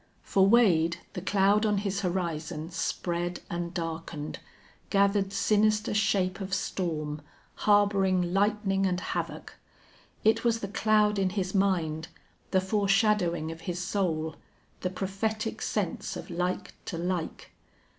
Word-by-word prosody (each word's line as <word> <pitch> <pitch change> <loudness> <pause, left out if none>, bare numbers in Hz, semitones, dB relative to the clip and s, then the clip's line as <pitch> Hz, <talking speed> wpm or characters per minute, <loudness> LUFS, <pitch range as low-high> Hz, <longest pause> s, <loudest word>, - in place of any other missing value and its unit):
For 195 -1 +3
Wade, 175 -7 +4 0.2
the 180 - -4
cloud 200 +3 +3
on 210 -2 +2
his 200 -1 -1
horizon 170 -3 -3
spread 175 0 -2
and 170 0 -3
darkened, 165 -3 -5 0.5
gathered 200 -1 +2
sinister 210 +1 +2
shape 200 -3 +1
of 190 0 -1
storm, 155 -6 -2 0.3
harboring 195 -4 +3
lightning 195 -1 +2
and 180 -1 0
havoc. - - -4 0.7
It 220 +1 +3
was 230 -1 +1
the 200 - -3
cloud 210 -1 +3
in 190 -1 +2
his 190 -1 -2
mind, 170 -5 +1 0.4
the 190 - +3
foreshadowing 195 -4 +2
of 165 0 -9
his 175 -1 -4
soul, 175 -4 -1 0.4
the 180 - -1
prophetic 215 +4 -3
sense - - -2
of - - -8
like 180 +1 -2
to 170 - -4
like. 175 -1 -3
190 Hz, 125 wpm, -28 LUFS, 170-205 Hz, 0.7 s, Wade